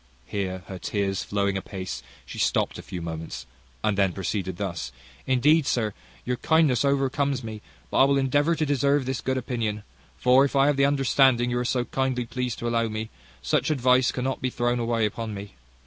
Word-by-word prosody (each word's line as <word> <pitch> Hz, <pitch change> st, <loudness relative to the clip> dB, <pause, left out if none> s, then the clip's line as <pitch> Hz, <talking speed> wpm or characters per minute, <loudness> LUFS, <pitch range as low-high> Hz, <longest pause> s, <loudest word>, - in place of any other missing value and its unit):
Here 95 Hz, +2 st, -3 dB
her 95 Hz, -1 st, -7 dB
tears 100 Hz, -1 st, -1 dB
flowing 100 Hz, -1 st, 0 dB
apace, 95 Hz, -1 st, -5 dB, 0.2 s
she -, -, -8 dB
stopped -, -, +1 dB
a -, -, -6 dB
few 90 Hz, -2 st, -7 dB
moments, 80 Hz, -1 st, -6 dB, 0.4 s
and 105 Hz, -, +2 dB
then 95 Hz, -2 st, +2 dB
proceeded 95 Hz, -1 st, -3 dB
thus: 85 Hz, -10 st, -4 dB, 0.4 s
"Indeed, 140 Hz, +4 st, +4 dB
sir, 110 Hz, -4 st, 0 dB, 0.3 s
your 125 Hz, 0 st, -1 dB
kindness 155 Hz, -5 st, +3 dB
overcomes 140 Hz, -1 st, +1 dB
me; 110 Hz, -2 st, -6 dB, 0.3 s
but -, -, 0 dB
I -, -, +8 dB
will 140 Hz, 0 st, +3 dB
endeavour 145 Hz, +5 st, +2 dB
to 155 Hz, -, 0 dB
deserve 140 Hz, -1 st, +2 dB
this 130 Hz, -1 st, -2 dB
good 130 Hz, 0 st, -1 dB
opinion: 115 Hz, -4 st, -2 dB, 0.3 s
for 125 Hz, +2 st, +5 dB
if 140 Hz, -, -1 dB
I 135 Hz, 0 st, +5 dB
have 145 Hz, -1 st, +2 dB
the 140 Hz, -, +4 dB
understanding 135 Hz, -3 st, +3 dB
you 120 Hz, -, 0 dB
are 125 Hz, -, -1 dB
so 125 Hz, 0 st, 0 dB
kindly 130 Hz, -2 st, -1 dB
pleased 125 Hz, 0 st, -3 dB
to 120 Hz, -, -4 dB
allow 115 Hz, -1 st, +1 dB
me, 110 Hz, 0 st, -5 dB, 0.3 s
such 70 Hz, -, +1 dB
advice 130 Hz, -3 st, +3 dB
cannot 130 Hz, +1 st, -2 dB
be 130 Hz, -, 0 dB
thrown 120 Hz, 0 st, 0 dB
away 115 Hz, -1 st, +1 dB
upon 110 Hz, 0 st, -4 dB
me. 100 Hz, -1 st, -8 dB
120 Hz, 195 wpm, -25 LUFS, 105-135 Hz, 0.4 s, I